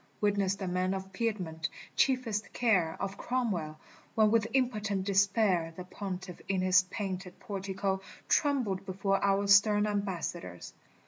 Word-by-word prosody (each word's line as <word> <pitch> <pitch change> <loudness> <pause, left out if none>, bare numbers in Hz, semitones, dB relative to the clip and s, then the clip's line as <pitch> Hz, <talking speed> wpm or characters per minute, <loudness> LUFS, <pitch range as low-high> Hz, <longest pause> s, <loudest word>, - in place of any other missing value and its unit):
Witness 200 -2 +1
the 195 -1 -5
men 185 +1 0
of 190 0 -7
Piedmont, 185 -8 -2 0.3
chiefest 250 -6 +1
care 185 -9 +2
Of 195 +1 -4
Cromwell, 190 -12 -1 0.4
when 215 -1 +4
with 225 -1 +3
impotent 210 -7 0
despair 195 -4 +2
The 180 - -5
Pontiff 185 -1 -6
in 190 -1 0
his 185 0 +5
painted 190 -2 -5
portico 195 -2 -3 0.3
Trembled 245 -10 +1
before 195 0 -1
our 200 0 +2
stern 205 +1 +5
ambassadors. 180 - -3
195 Hz, 130 wpm, -31 LUFS, 185-210 Hz, 0.4 s, his